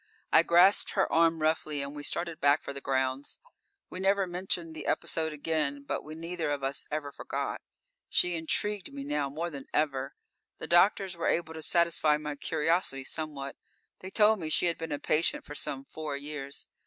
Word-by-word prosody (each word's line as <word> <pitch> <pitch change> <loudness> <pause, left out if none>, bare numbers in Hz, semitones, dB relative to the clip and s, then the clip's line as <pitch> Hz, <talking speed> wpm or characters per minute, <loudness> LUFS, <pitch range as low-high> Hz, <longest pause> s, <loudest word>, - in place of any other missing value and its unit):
I 160 - +8
grasped 175 +4 +5
her 195 - +2
arm 165 -1 +4
roughly 155 -2 0
and 140 +1 -6
we 145 - -5
started 170 +2 -2
back 145 0 +4
for 140 - -5
the 140 - -7
grounds. 130 +1 -1 0.5
We 185 - -5
never 195 +1 +3
mentioned 175 -2 -2
the 155 - -7
episode 160 -1 0
again, 150 -2 -2
but - - -3
we 155 +1 -8
neither 165 0 -3
of 145 -2 -2
us 135 +1 0
ever 150 -1 -3
forgot. - - -4 0.5
She 180 - +2
intrigued 195 +5 -1
me 140 0 -6
now, 145 0 -1
more 165 +5 -4
than 140 -2 -8
ever. 145 - 0 0.4
The - - -6
doctors 190 +1 +4
were 170 - -2
able 165 -1 0
to 160 - -7
satisfy 165 -2 +3
my 150 -1 -5
curiosity 160 -2 0
somewhat. 140 -1 -5 0.4
They 185 - -8
told 210 +1 +4
me 160 -3 -4
she 155 - +3
had 170 -1 0
been 165 -1 -5
a 145 - -1
patient 155 +3 +1
for 145 - -8
some 135 -2 -4
four 150 -2 -5
years. 140 -1 -6
155 Hz, 190 wpm, -30 LUFS, 145-170 Hz, 0.5 s, I